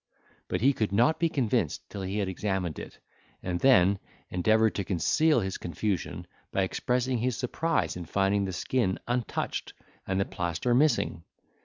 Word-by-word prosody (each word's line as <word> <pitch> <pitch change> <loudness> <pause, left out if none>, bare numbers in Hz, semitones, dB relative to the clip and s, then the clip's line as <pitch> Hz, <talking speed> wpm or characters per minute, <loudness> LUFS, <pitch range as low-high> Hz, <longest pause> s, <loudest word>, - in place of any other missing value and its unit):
But - - -2
he 135 +4 +5
could 110 -6 -1
not 120 +10 +3
be 170 - +2
convinced 130 -8 0
till 100 - -5
he 95 +2 -3
had 100 -2 0
examined 95 -4 -2
it, - - -9 0.5
and 90 -1 -2
then 100 -7 +5 0.3
endeavoured 110 +4 +3
to 100 - -2
conceal 120 - +2
his 95 -1 -3
confusion, 90 +2 -3 0.3
by 95 - +1
expressing 125 +5 0
his 125 +1 0
surprise 165 +6 -1
in 90 -1 -6
finding 100 +3 +1
the 95 - -3
skin 95 +1 0
untouched 120 -1 -2 0.3
and 95 0 0
the 95 - +2
plaster 90 +7 -1
missing. 130 - +2
100 Hz, 160 wpm, -28 LUFS, 95-125 Hz, 0.5 s, he